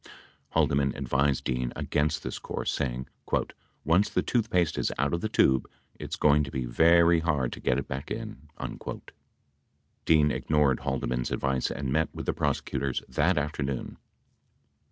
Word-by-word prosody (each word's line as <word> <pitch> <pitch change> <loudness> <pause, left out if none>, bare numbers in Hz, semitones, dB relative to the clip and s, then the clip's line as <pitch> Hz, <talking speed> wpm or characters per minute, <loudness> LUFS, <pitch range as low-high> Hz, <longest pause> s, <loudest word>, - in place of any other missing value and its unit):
Haldeman 70 -1 +2
advised 70 +1 +1
Dean 60 -1 -1
against 75 +1 0
this - - -4
course, - - -3
say 70 -3 0
ing: 65 +1 -6 0.8
"Once 85 +7 +3
the - - 0
toothpaste 105 -9 +1
is - - 0
out 70 +4 0
of 85 - 0
the 110 - -1
tube, 65 - +3 0.2
it's - - -6
going 75 0 +4
to 70 - -5
be 65 -2 -3
very 85 +6 +5
hard 75 -7 0
to - - -8
get 60 - +1
it 70 - -3
back 65 +2 -5
in." 75 +3 -6 1.6
Dean 75 -2 +4
ignored 75 -4 +2
Haldeman's 65 -3 -2
advice 65 -1 0
and 70 -2 -3
met 80 0 +2
with - - -5
the - - 0
prosecutors 70 -1 -1
that 75 +7 +1
afternoon. 70 -3 -3
70 Hz, 155 wpm, -28 LUFS, 65-80 Hz, 1.6 s, very